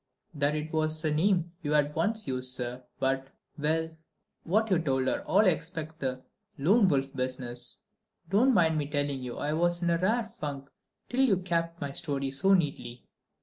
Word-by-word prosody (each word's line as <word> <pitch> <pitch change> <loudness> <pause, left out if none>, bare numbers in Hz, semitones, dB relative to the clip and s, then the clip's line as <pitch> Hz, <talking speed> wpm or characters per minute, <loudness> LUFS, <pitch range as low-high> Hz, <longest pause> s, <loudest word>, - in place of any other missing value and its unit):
"That 145 0 +1
it 155 +1 -4
was 155 0 +1
a 155 - +2
name 175 +1 +2
you 150 -1 -1
had 150 0 +2
once 215 +7 -1
used, 130 -1 0
sir, 125 +1 -3 0.2
but.... 135 0 0 0.3
Well, 160 +2 0 0.5
what 215 +5 +1
you 180 - +4
told 135 -5 0
her, - - 0
all 205 +3 +4
except 165 -3 -1
the 130 -1 -3 0.3
Lone 195 +9 +4
Wolf 135 -4 0
business. 125 - -2 0.4
Don't 230 +8 +4
mind 160 -5 +2
telling 145 -2 -1
you 125 -1 -6
I 150 - -1
was 175 +2 +1
in 170 - +2
a 170 - +2
rare 220 +6 +1
funk 145 -11 -7 0.4
till 255 +2 0
you 235 -8 +4
capped 170 -2 -2
my 140 -1 -4
story 140 -1 -2
so 190 +8 +4
neatly." 125 -8 -2
155 Hz, 175 wpm, -29 LUFS, 135-175 Hz, 0.5 s, you